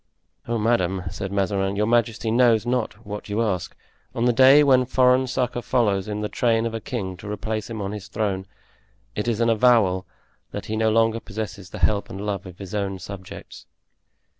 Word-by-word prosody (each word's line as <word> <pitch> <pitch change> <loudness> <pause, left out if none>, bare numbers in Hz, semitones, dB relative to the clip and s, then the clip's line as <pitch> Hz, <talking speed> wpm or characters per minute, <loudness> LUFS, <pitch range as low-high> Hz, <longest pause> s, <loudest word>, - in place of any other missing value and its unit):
"Oh, 120 0 0
madame," 95 -5 +1
said 95 0 -5
Mazarin, 95 0 0
"your 105 +1 +1
majesty 115 -1 +1
knows 115 -2 +4
not 120 -3 -2
what 105 +1 -7
you 105 +3 0
ask. 95 -5 -2 0.4
On 120 - 0
the 125 - +4
day 135 +4 +7
when 130 -3 +5
foreign 130 0 +3
succor 125 -1 -1
follows 105 -7 +1
in 105 0 -3
the 105 - -1
train 115 0 +1
of 115 - -3
a 115 - -3
king 100 -8 -4
to 100 +3 -9
replace 110 +1 -3
him 110 -3 -4
on 100 - -3
his 105 -2 -7
throne, 100 -3 -2 0.7
it 105 - -2
is 115 -2 0
an 115 - +3
avowal 105 -6 +3 0.4
that - - -6
he 110 - -3
no 110 0 +2
longer 115 +1 +2
possesses 100 -3 -7
the - - -8
help 105 -2 +1
and 95 - -7
love 100 -3 -3
of 90 -1 -11
his 95 -1 -9
own 100 -2 -2
subjects." 95 0 -10
110 Hz, 195 wpm, -23 LUFS, 100-120 Hz, 0.7 s, day